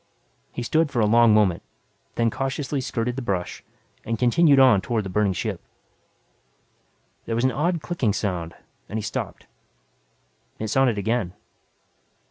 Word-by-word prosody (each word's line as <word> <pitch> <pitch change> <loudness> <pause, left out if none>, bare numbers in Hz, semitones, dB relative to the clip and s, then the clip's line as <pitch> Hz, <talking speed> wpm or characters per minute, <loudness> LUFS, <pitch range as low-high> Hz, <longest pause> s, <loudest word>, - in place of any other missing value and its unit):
He 120 - -5
stood 160 +5 +1
for 130 - -2
a 110 - +4
long 115 +1 +5
moment, 105 -5 +3 0.5
then 115 -1 +1
cautiously 135 +2 -2
skirted 120 0 -3
the - - -2
brush, 95 -7 -3 0.4
and 115 0 -2
continued 140 +4 +4
on 125 -7 +6
toward 110 0 -1
the 95 - -5
burning 105 -1 +2
ship. 90 - -4 1.7
There 115 - -1
was 120 - 0
an 130 - +3
odd 165 +6 -1
clicking 155 -11 0
sound 90 -5 -3 0.3
and 110 - -4
he 110 - -3
stopped. 100 - -5 1.1
It 110 - -4
sounded 125 -2 +2
again. 100 -3 -1
115 Hz, 145 wpm, -24 LUFS, 105-135 Hz, 1.7 s, on